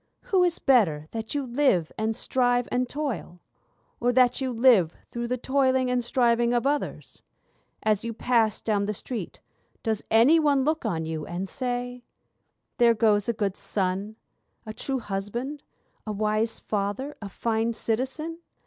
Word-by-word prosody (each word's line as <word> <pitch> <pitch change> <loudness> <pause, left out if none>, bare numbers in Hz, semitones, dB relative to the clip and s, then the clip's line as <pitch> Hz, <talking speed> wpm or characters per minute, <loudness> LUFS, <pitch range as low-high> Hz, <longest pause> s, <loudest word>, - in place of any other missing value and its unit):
Who 375 -2 +2
is 350 -2 +2
better 185 - +3
that 225 +3 -4
you 285 -2 -1
live, 240 - +1
and 220 +1 -1
strive, 245 0 +1
and 250 0 0
toil? 275 -11 -4 0.6
Or 245 +1 +2
that 250 +1 +3
you 260 -1 -1
live 225 -9 +4
through 235 0 -4
the 250 +1 -1
toiling 260 0 +1
and 250 -1 +1
striving 240 -1 +2
of 240 - 0
others? 290 +1 -2 0.6
As 215 -1 +1
you 230 - -3
pass 230 -1 +1
down 205 -2 0
the 210 +1 -2
street 220 -3 -6 0.4
does 220 -2 -1
any 245 +9 +6
one 285 -3 +3
look 315 +1 0
on 160 -2 -1
you 160 -1 -4
and 180 +3 -4
say, 245 0 -3 0.8
'There 235 -1 +5
goes 210 -1 +2
a - - +2
good 205 -3 -1
son, 195 +2 -2 0.5
a 215 - -6
true 270 +4 -2
husband, 230 +9 -4 0.5
a - - -1
wise 215 +2 0
father, 210 +8 -3
a 200 - -6
fine 225 +2 -1
citizen? 265 +10 -2
235 Hz, 160 wpm, -26 LUFS, 210-260 Hz, 0.8 s, any